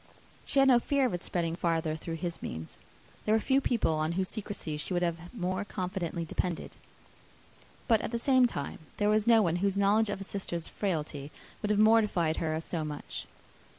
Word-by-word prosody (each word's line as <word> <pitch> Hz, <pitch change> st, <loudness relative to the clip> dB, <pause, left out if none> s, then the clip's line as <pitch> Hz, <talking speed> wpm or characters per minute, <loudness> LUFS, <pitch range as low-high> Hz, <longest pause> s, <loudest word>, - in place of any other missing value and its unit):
She -, -, -2 dB
had 270 Hz, 0 st, +7 dB
no 245 Hz, -2 st, +7 dB
fear 280 Hz, +2 st, +1 dB
of 250 Hz, -, 0 dB
its 175 Hz, -, -3 dB
spreading 170 Hz, -2 st, -1 dB
farther, 165 Hz, -2 st, 0 dB
through 165 Hz, +1 st, -5 dB
his 170 Hz, +1 st, -4 dB
means. 80 Hz, 0 st, -6 dB, 0.5 s
There 215 Hz, -, +4 dB
were -, -, +4 dB
few 270 Hz, +4 st, +2 dB
people 235 Hz, -11 st, +1 dB
on 155 Hz, +1 st, 0 dB
whose 185 Hz, +1 st, -1 dB
secrecy 205 Hz, -7 st, -4 dB
she 165 Hz, +5 st, -3 dB
would 175 Hz, -, +1 dB
have 170 Hz, 0 st, -2 dB
more 185 Hz, -3 st, -2 dB
confidently 180 Hz, -3 st, -3 dB
depended; 170 Hz, +1 st, -3 dB, 1.1 s
but 225 Hz, -4 st, +4 dB
at -, -, -3 dB
the 235 Hz, -, -1 dB
same 255 Hz, +1 st, +4 dB
time 140 Hz, -11 st, -5 dB, 0.2 s
there 205 Hz, 0 st, +2 dB
was 215 Hz, +1 st, +2 dB
no 225 Hz, -2 st, +6 dB
one 170 Hz, -2 st, +1 dB
whose 200 Hz, +1 st, 0 dB
knowledge 205 Hz, +2 st, +3 dB
of 205 Hz, -, -2 dB
a -, -, -5 dB
sister's 180 Hz, -4 st, -4 dB
frailty 150 Hz, -7 st, -3 dB, 0.3 s
would 210 Hz, -, -1 dB
have 210 Hz, -, +3 dB
mortified 210 Hz, -7 st, +4 dB
her 160 Hz, -1 st, -1 dB
so 165 Hz, 0 st, -3 dB
much. 150 Hz, -1 st, -5 dB
185 Hz, 195 wpm, -30 LUFS, 165-215 Hz, 1.1 s, had